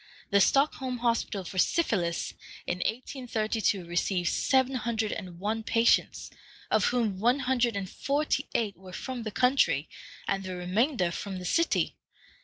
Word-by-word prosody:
The 200 0 +5
Stockholm 265 +1 +2
Hospital 230 -4 0
for 185 +1 -4
syphilis 180 - +1 0.3
in 175 - -2
1832 220 -4 -1
received 175 +1 0
seven 265 0 +2
hundred 225 -3 -1
and 180 -3 -6
one 215 +5 -2
patients, 230 +1 +2 0.4
of - - +3
whom 225 -6 0
one 245 +6 +3
hundred 250 -3 +1
and 195 -1 -3
forty 280 +6 -1
eight 210 -4 0
were 185 +1 -13
from 255 +4 -5
the 220 -2 -4
country, 250 - +2 0.4
and 195 0 0
the 185 -1 -5
remainder 185 - +1
from 195 +2 -5
the 180 - -7
city. 335 - +1
220 Hz, 145 wpm, -28 LUFS, 185-250 Hz, 0.4 s, The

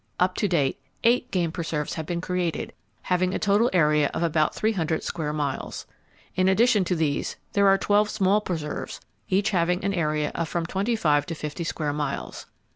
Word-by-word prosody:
Up 185 +1 +3
to 205 - +1
date, 150 -7 +1 0.2
eight 240 +2 +3
game 175 -3 0
preserves 160 -3 -3
have 160 -2 -5
been 170 -1 -2
created, 180 -2 -2 0.3
having 185 +1 +1
a - - +2
total 210 +3 +3
area 150 -4 +3
of - - -1
about 155 -2 +1
thee 220 - +1
hundred 165 -6 -1
square 155 -3 -3
miles. 145 -3 -3 0.5
In 185 0 +3
addition 215 +1 +4
to 180 - 0
these, 155 -3 -1 0.2
there 200 0 +4
are 195 0 +6
twelve 205 +1 +2
small 205 0 +2
preserves, 160 -7 -4 0.3
each 200 +3 +2
having 180 -1 +1
an 200 - +1
area 150 -4 0
of 165 -2 -2
from 170 -1 -1
twenty 200 +7 -1
five 145 -8 +2
to 165 - -4
fifty 155 +2 -5
square 155 -3 -2
miles. 150 0 -4
175 Hz, 190 wpm, -25 LUFS, 155-195 Hz, 0.5 s, are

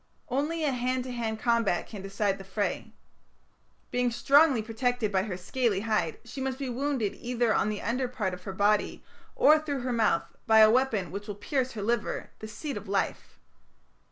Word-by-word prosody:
Only 305 +5 -1
a 295 - +2
hand 255 0 -1
to 255 - -6
hand 225 -2 -3
combat 230 -7 +1
can 210 -3 -9
decide 195 0 -1
the - - -8
fray. 200 +1 -3 1.0
Being 245 0 +1
strongly 275 +1 +4
protected 230 0 -1
by 190 -2 +2
her 190 -3 -4
scaly 205 +1 0
hide, 215 -8 0
she 270 - -7
must 265 -1 -2
be 270 -2 -4
wounded 260 -4 -1
either 240 -2 0
on - - +1
the 210 -1 -4
under 250 +3 0
part 220 -7 -3
of 180 0 -9
her 195 - -4
body 205 +2 +1 0.3
or 310 +1 +6
through 290 -4 -3
her 250 0 -2
mouth 220 -8 +2 0.2
by 220 0 +6
a 215 0 +8
weapon 230 -7 +1
which 200 +3 -6
will 205 - -5
pierce 260 +5 -2
her 210 -3 -5
liver, 230 0 -1
the 215 - -7
seat 275 +7 -5
of - - -8
life. - - -2
230 Hz, 190 wpm, -28 LUFS, 205-255 Hz, 1.0 s, a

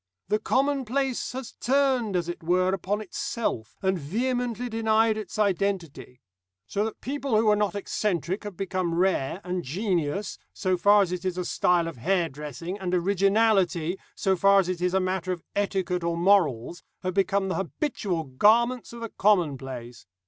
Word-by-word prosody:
The 210 - +2
commonplace 270 0 0
has 260 -2 -6
turned, 260 -6 +2
as 175 -2 0
it 175 - -5
were, 185 +3 +2
upon 195 +3 -1
itself, 215 - -3
and 190 -1 +1
vehemently 245 - -2
denied 225 -1 +2
its 215 -3 -6
identity. 190 -10 -1 0.4
So 200 - -1
that 220 - -6
people 275 -2 -2
who 220 - +3
were 210 -1 +5
not 205 -2 0
eccentric 190 -2 -2
have 205 -4 -7
become 185 -3 -2
rare, 180 -2 +1
and 180 0 -2
genius, 180 - -2
so 185 -2 0
far 205 +3 +5
as 180 - -4
it 180 0 -3
is 185 -1 -2
a 180 - -2
style 175 -1 +2
of 165 - -7
hairdressing, 165 - -2
and 185 -1 -1
originality, 195 -2 +2 0.2
so 190 -1 +1
far 195 +2 +5
as 185 -2 0
it 180 -1 -3
is 180 +1 +1
a - - +4
matter 185 -1 -1
of 175 -3 -4
etiquette 190 -3 -1
or 170 0 -1
morals, 170 - +2 0.2
have 185 0 -1
become 195 0 +1
the 185 - -1
habitual 190 - -2
garments 230 - +2
of 235 - -9
the 230 - -4
commonplace. 135 - -1
190 Hz, 165 wpm, -26 LUFS, 175-215 Hz, 0.4 s, were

